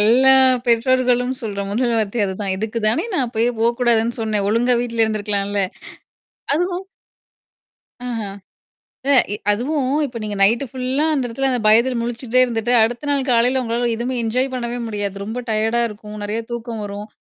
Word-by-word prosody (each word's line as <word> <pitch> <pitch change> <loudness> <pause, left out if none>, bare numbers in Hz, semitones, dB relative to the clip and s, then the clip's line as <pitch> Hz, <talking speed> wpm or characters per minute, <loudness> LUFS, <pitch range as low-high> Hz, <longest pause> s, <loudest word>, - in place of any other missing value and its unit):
எல்லா 255 +5 +6 0.3
பெற்றோர்களும் 250 +1 +2
சொல்ற 205 -3 -4
முதல் 235 +3 0
வார்த்தை 220 +2 -1
அதுதான். 190 0 -3
இதுக்குதானே 220 - 0
நான் 275 -7 +2
அப்பயே 230 +1 0
போகக் 235 +2 +1
கூடாதுன்னு 235 -1 +2
சொன்னேன். 215 -3 0
ஒழுங்கா 240 +3 +2
வீட்ல 230 -2 0
இருந்திருக்கலாம்ல. 205 -2 -1 0.9
அதுவும் 355 +3 -1 1.2
ஆஹா. 225 -4 -4 0.8
இல்ல, 280 - +2 0.2
எ - - -3
அதுவும் 265 +5 0
இப்ப 240 -3 -7
நீங்க 210 -1 -3
நைட் 230 +7 +4
புல்லா 260 +3 -1
அந்த 270 -4 0
இடத்துல 270 +3 -1
அந்த 255 -1 +1
இடத்துல 220 - -2
பயத்துல 235 +4 +4
முழிச்சுகிட்டே 240 +1 0
இருந்துட்டு, 235 -1 -1
அடுத்த 240 +6 -1
நாள் 280 -1 +1
காலையில 245 +2 +3
உங்களால 235 +1 -1
எதுவுமே 245 +3 -3
என்ஜாய் 250 +4 0
பண்ணவே 240 -1 -3
முடியாது. 205 -3 -3
ரொம்ப 225 +4 -4
டையர்டா 220 +2 +1
இருக்கும். 210 0 -10
நிறைய 210 +2 -2
தூக்கம் 235 -2 -5
வரும். 205 +1 -6
235 Hz, 155 wpm, -20 LUFS, 215-250 Hz, 1.2 s, எல்லா